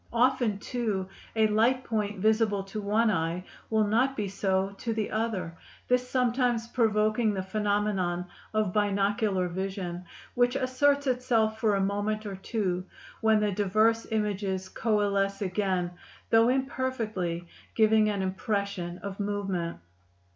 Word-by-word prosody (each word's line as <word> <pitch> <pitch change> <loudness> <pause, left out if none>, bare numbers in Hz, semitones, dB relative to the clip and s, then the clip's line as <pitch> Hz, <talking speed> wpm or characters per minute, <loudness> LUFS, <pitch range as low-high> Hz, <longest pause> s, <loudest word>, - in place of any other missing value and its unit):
Often, 245 -3 +2
too, 210 -4 -2 0.3
a 220 -1 +4
light 230 +5 +3
point 210 -3 -2
visible 215 -2 +2
to 195 +2 -6
one 215 +2 +2
eye 170 -1 -1 0.3
will 220 -1 +3
not 250 +6 +2
be 210 -2 -1
so 195 0 0
to 230 -2 -2
the 215 -2 -2
other, 210 -7 -2 0.3
this 250 0 +2
sometimes 245 -2 +1
provoking 215 -2 +2
the 190 - -2
phenomenon 200 -3 0 0.3
of 215 -4 0
binocular 200 -2 +1
vision, 185 -1 -4 0.3
which 245 +1 +2
asserts 280 +2 +2
itself 240 -4 +1
for 215 -2 +2
a 195 - +1
moment 205 +2 -1
or 200 -2 -4
two, 190 -2 -2 0.4
when 220 -1 +4
the 210 -1 +1
diverse 215 +4 +2
images 200 -3 -1
coalesce 200 -3 +1
again, 185 -2 0 0.4
though 225 +1 +6
imperfectly, 230 -10 -1 0.3
giving 220 -1 +4
an 200 -2 -1
impression 190 -2 -2
of 200 0 -6
movement. 195 -4 -2
210 Hz, 135 wpm, -28 LUFS, 195-225 Hz, 0.4 s, though